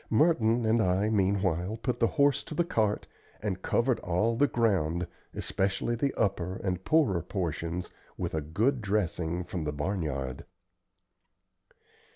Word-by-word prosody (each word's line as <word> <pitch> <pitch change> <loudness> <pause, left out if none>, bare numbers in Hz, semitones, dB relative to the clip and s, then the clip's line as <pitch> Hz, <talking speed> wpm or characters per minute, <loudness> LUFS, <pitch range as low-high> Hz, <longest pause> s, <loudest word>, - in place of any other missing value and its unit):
Merton 115 -4 +3
and 110 +1 +3
I 95 +3 +2
meanwhile 95 -1 +1
put 120 +1 -2
the 115 - +4
horse 140 0 +3
to 155 - -6
the 175 - +3
cart 110 - 0 0.3
and 95 -3 -3
covered 120 +4 +1
all 100 +7 +1
the 145 +5 +4
ground, 90 - +1 0.3
especially 95 +4 -1
the 135 +4 0
upper 95 -3 0
and 95 -1 -3
poorer 130 - +3
portions, 85 -1 -3 0.3
with - - -3
a 80 - 0
good 110 - 0
dressing 90 -4 -1
from 90 -1 -4
the 75 - -1
barnyard. 75 -5 -3
100 Hz, 140 wpm, -29 LUFS, 90-115 Hz, 0.3 s, the